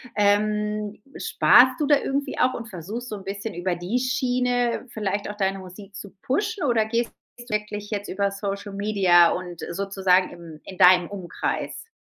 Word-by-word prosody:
Ähm, 210 0 +1 0.2
sparst 255 +1 +5
du 295 - +1
da 290 -1 +5
irgendwie 275 0 -3
auch 255 +1 +3
und 230 -2 -6
versuchst 210 +7 -6
so 210 - -5
'n 195 - -11
bisschen 200 +3 -5
über 175 +1 -2
die 180 +8 -2
Schiene 250 -1 0
vielleicht 205 -3 -3
auch 210 - -6
deine 195 -1 0
Musik 190 +2 -12
zu 200 -1 -9
pushen, 410 - -1
oder 235 -6 +2
gehst 230 +1 -1 0.3
du 240 - -10
wirklich 210 -1 -3
jetzt 205 -1 -3
über 200 +1 0
Social 200 0 -5
Media 195 -4 +4
und 180 -2 -5
sozusagen 190 0 +1
im 165 -3 -12
in 190 - -10
deinem 180 -1 +6
Umkreis? 195 - -4
205 Hz, 170 wpm, -24 LUFS, 190-235 Hz, 0.3 s, deinem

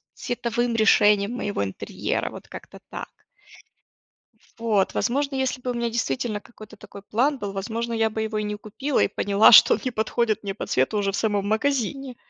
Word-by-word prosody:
цветовым 240 -1 -2
решениям 210 -1 +4
моего 205 - -3
интерьера, 95 -1 -3
вот - - -11
как-то - - -11
так. - - -9 1.4
Вот, 215 -4 +1
возможно, 275 +2 -1
если 260 -1 -1
бы 250 - -2
у - - -3
меня 235 0 -1
действительно 215 - -2
какой-то 215 -2 -14
такой 200 - -12
план 265 +8 0
был, 205 -4 -5
возможно, 230 +4 -4
я 225 -1 +1
бы 220 0 -4
его 220 -1 -3
и 210 - -1
не 210 0 -3
купила 265 +7 -3
и - - +4
поняла, 200 +1 +4
что 220 - +9
он - - -1
не 255 - -1
подходит 220 -1 -1
мне 195 - -3
по 200 - -6
цвету 130 +11 +1
уже 200 -1 0
в - - -4
самом 205 -2 0
магазине. 265 +3 -1
220 Hz, 185 wpm, -24 LUFS, 205-240 Hz, 1.4 s, что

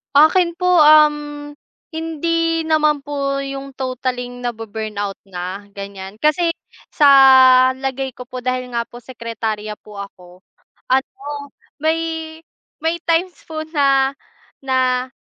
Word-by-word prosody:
Akin 340 +4 +5
po 360 -1 +3
uhm, 295 -1 +4 0.4
hindi 330 +1 -1
naman 305 -2 +2
po 275 -1 -2
'yung 275 0 -7
totaling 250 -1 -4
nabu-burnout 220 -3 -4
na 185 +2 -6
ganiyan. 200 0 -8
Kasi 330 +3 +2 0.4
sa 295 - +5 0.7
lagay 265 0 -4
ko 250 - -8
po 255 0 -6
dahil 255 0 -3
nga 235 -1 -1
po 240 - -12
sekretarya 225 -3 -5
po 210 -1 -12
ako, 185 -3 -10 0.6
ano 265 0 +2 0.7
may 320 0 -2 0.4
may 325 +1 0
times 340 +2 +1
po 315 -1 -4
na 275 -2 +3 0.5
na 255 -1 +1
270 Hz, 115 wpm, -19 LUFS, 235-315 Hz, 0.7 s, Akin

